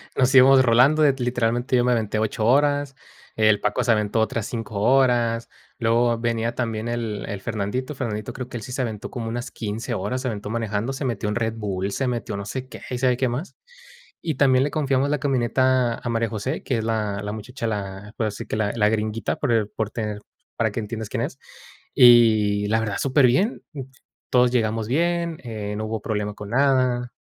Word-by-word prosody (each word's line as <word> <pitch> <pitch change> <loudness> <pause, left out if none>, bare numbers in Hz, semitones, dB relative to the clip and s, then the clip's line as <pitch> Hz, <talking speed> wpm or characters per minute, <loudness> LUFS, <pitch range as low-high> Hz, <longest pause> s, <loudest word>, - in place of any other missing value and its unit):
Nos 130 +1 +2
íbamos 130 0 +7
rolando, 130 +6 +4
l 140 -2 +5
literalmente 120 0 0
yo 120 - +3
me 125 - +2
aventé 110 -3 0
8 110 0 -1
horas, 145 +1 +2 0.4
el 110 -1 +4
Paco 105 +4 0
se 115 - +2
aventó 105 0 +1
otras 110 -1 -1
5 110 -3 -5
horas, 120 -1 +2 0.3
luego 115 0 +2
venía 115 0 -1
también 115 -2 -2
el 115 -3 -3
el 100 -1 -5
Fernandito, 115 +6 -3
Fernandito 110 -3 -4
creo 125 +1 -6
que 125 - -10
él 110 - -5
sí 125 - -8
se 130 +1 -1
aventó 110 -3 -5
como 115 -2 -5
unas 120 +2 -4
15 110 +1 -4
horas, 130 0 -2
se 130 - -2
aventó 105 -1 -5
manejando, 115 +2 -2
se 140 - -5
metió 115 -4 -2
un 105 - -1
Red 115 -1 -1
Bull, 100 -2 -3
se 130 +5 -1
metió 120 -4 -3
no 100 - -5
sé 130 +4 -5
qué, - - -9
y 125 -1 -3
sabe 125 -2 +2
qué 130 -1 +1
más. 130 +10 -5 0.6
Y 160 -4 -2
también 130 -1 +4
le 145 - -1
confiamos 140 -2 +1
la 150 - 0
camioneta 130 -2 +2
a 120 - -6
María 115 -1 0
José, 115 +7 -3
que 125 - -1
es 110 - -3
la 105 -3 -1
la 105 +1 -4
muchacha, 115 +2 -5
la 100 0 -5
puedo 110 - -1
decir 100 - -8
que - - -3
la 110 -1 0
la 105 -2 +3
gringuita 110 0 -1
por 140 -5 -1
el 110 -3 +2
por 110 -1 -3
tener 105 -2 -4 0.4
para 110 -2 0
que 115 - -4
entiendas 110 0 -5
quién - - -2
es. - - -5 0.6
Y 110 -4 +6
la 110 +1 +2
verdad 105 -3 -2
súper 135 0 +3
bien, 190 - +1 0.7
todos 125 -1 +4
llegamos 110 -2 0
bien, 170 +3 0
eh, 105 -3 -5
no 110 - -3
hubo 110 -1 -4
problema 105 -2 -2
con 105 0 -9
nada. 130 -2 +2
115 Hz, 210 wpm, -23 LUFS, 110-130 Hz, 0.7 s, íbamos